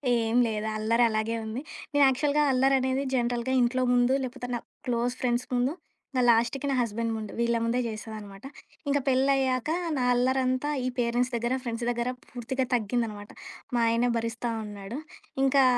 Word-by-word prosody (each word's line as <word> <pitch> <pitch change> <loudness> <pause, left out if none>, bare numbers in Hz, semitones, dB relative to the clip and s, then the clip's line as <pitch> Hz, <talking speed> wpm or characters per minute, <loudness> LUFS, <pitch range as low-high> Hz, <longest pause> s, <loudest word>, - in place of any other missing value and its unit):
ఏం 230 0 0
లేదు. 215 -1 -2
అల్లరి 230 +2 +2
అలాగే 220 +1 -1
ఉంది. 220 +5 -4 0.3
నేను 290 0 +5
యాక్చువల్‌గా 285 +3 +2
అల్లరనేది 265 0 +2
జనరల్‌గా 240 +1 0
ఇంట్లో 245 +2 +2
ముందు, 245 +1 +4
లేకపోతే 250 0 -5
నా 240 - -2 0.3
క్లోజ్ 245 0 0
ఫ్రెండ్స్ 245 0 0
ముందు, 250 +4 +1 0.4
నా 255 - +3
లాస్ట్‌కి 235 +4 +2
నా - - +1
హస్బెండ్ 230 0 -1
ముందు 215 -1 -6
వీళ్ళ 235 0 +2
ముందే 235 +2 +1
చేసేదనమాట. 215 -1 -8 0.4
ఇంక 285 0 +3
పెళ్లయ్యాక, 265 0 +2 0.3
నా 255 - +1
అల్లరంతా 255 +2 +1 0.2
ఈ - - +1
పేరెంట్స్ 245 +2 +1
దగ్గర, 235 +2 0
ఫ్రెండ్స్ 235 -1 -3
దగ్గర 240 +1 -1 0.2
పూర్తిగా 255 +2 -2
తగ్గిందనమాట. 215 -2 -2 0.5
మా - - +3
ఆయనే 235 +2 +2
భరిస్టా 230 +1 -2
ఉన్నాడు. 205 +3 -7 0.5
ఇంకా 270 0 +5
245 Hz, 150 wpm, -27 LUFS, 230-260 Hz, 0.5 s, నేను